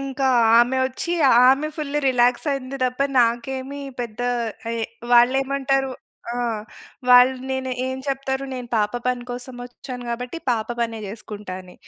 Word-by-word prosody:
ఇంకా 275 0 -2 0.3
ఆమె 245 +2 +3
వచ్చి, 300 +6 -4 0.4
ఆమె 275 +3 +3
ఫుల్ 295 -2 -3
రిలాక్స్ 245 +1 +2
అయ్యింది 275 -1 -3
తప్ప 255 +1 -2 0.2
నాకేమి 260 +4 -1 0.2
పెద్ద 235 -1 -6 0.5
ఎహ్, 230 -1 -2 0.3
వాళ్ళు 240 +2 +6
ఏమంటారు 270 0 0 0.4
ఆహ్, 235 -3 -2 0.5
వాళ్ళు 250 +1 +7 0.2
నేను 260 0 -2 0.2
ఏం 260 - -3
చెప్తారు, 270 0 -2
"నేను 250 -2 -6
పాప 210 0 +1
పని 250 -1 -1
కోసం 245 +1 -7
వచ్చాను 245 0 -9
గాబట్టి, 245 +6 -4
పాప 225 -2 0
పనే 230 -1 -1
చేసుకుంటా" 205 -2 -8
అని. 180 0 -15
250 Hz, 140 wpm, -22 LUFS, 235-265 Hz, 0.5 s, వాళ్ళు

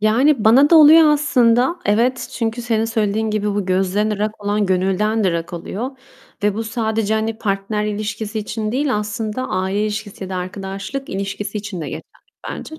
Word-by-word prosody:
Yani, 230 +4 +3
bana 265 +7 +6
da 330 - +8
oluyor 315 +1 +8
aslında. 260 -1 +3
Evet, 235 +5 +1
çünkü, 230 +1 -2
senin 225 -2 0
söylediğin 220 -1 0
gibi, 210 -1 -1
bu 200 -2 -2
gözden 190 +3 +1
ırak 210 0 -3
olan 205 0 +1
gönülden 195 +4 +1
de - - +4
ırak 170 0 -3
oluyor 205 +8 -4 0.5
ve 210 -1 +2
bu 225 - -2
sadece, 220 -1 -1
hani, 220 0 -2
partner 205 +1 -2
ilişkisi 210 +1 -3
için 215 0 -3
değil, 265 -1 0
aslında 215 +4 -3
aile 190 +2 -1
ilişkisi 210 -2 -4
ya 190 - -8
da 185 - -3
arkadaşlık 195 +8 -5
ilişkisi 200 +2 -4
için 205 -4 -6
de - - -4
geçerli - - -6 0.5
bence. 315 - -8
215 Hz, 175 wpm, -19 LUFS, 200-230 Hz, 0.5 s, da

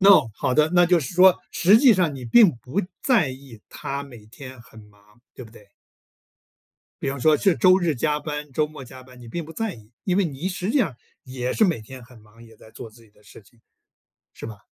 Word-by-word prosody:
那 190 - +5
好 130 - -2
的。 155 +2 +2
那 175 - +5
就 175 -1 +3
是 130 +2 -7
说， 185 +1 +5
实 195 +5 +4
际 255 -3 +5
上 175 -6 0
你 130 -2 -9
并 205 - +5
不 130 - -3 0.2
在 225 - +2
意 130 -4 -13
他 140 +1 -6
每 120 -6 -14
天 130 +3 -12
很 115 -1 -17
忙 105 +2 -25
对 130 - -10
不 110 - -16
对？ 105 -2 -18 1.4
比 135 - -2
方 140 -1 -6
说 155 +3 +4
是 190 +4 +2
周 185 +9 +4
日 170 -4 -1
加 150 +4 -1
班， 150 -1 -6
周 150 +3 0
末 150 -3 -12
加 130 +1 -13
班， 125 -1 -17
你 120 - -12
并 170 +7 -5
不 160 - -12
在 220 0 -4
意， 110 -1 -18
因 185 -2 0
为 200 - +2
你 150 +3 -4
实 185 +1 -4
际 290 - +1
上， 165 - -1 0.3
也 125 -1 -4
是 220 - +2
每 175 - 0
天 130 +3 -12
很 120 0 -17
忙， 110 +2 -20
也 115 -1 -18
在 110 - -18
做 115 - -10
自 115 +2 -20
己 110 - -23
的 105 - -27
事 105 - -16
情， 110 +4 -27 0.7
是 - - -10
吧？ 110 -3 -10
135 Hz, 255 characters per minute, -22 LUFS, 115-175 Hz, 1.4 s, 那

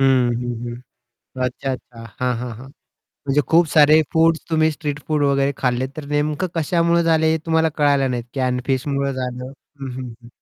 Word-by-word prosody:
हं. 130 -2 +4
हं, 120 0 -4
हं. 125 +1 -12 0.4
अच्छा, 125 +2 -2
अच्छा. 120 -2 -8 0.2
हां, 125 -1 0
हां, 125 +1 -5
हां. 125 +4 -11 0.6
म्हणजे 140 +1 +3
खूप 170 +1 +5
सारे 155 0 +6
फूड्स 165 0 +3
तुम्ही 160 -1 +3
स्ट्रीट 145 -1 -4
फूड 155 -2 +1
वगैरे 140 0 +2
खाल्ले, 125 0 0
तर 155 - -6
नेमकं 150 +4 0
कशामुळे 170 +1 +2
झाले 160 -1 +3
हे 160 - +1
तुम्हाला 160 0 +3
कळायला 140 -2 +3
नाही. 125 +1 -2
फिशमुळे 140 +1 0
झालं 125 -1 -5 0.3
हं, 135 -1 -5
हं, 125 -1 -6
हं. 120 - -14
135 Hz, 175 wpm, -21 LUFS, 125-155 Hz, 0.6 s, सारे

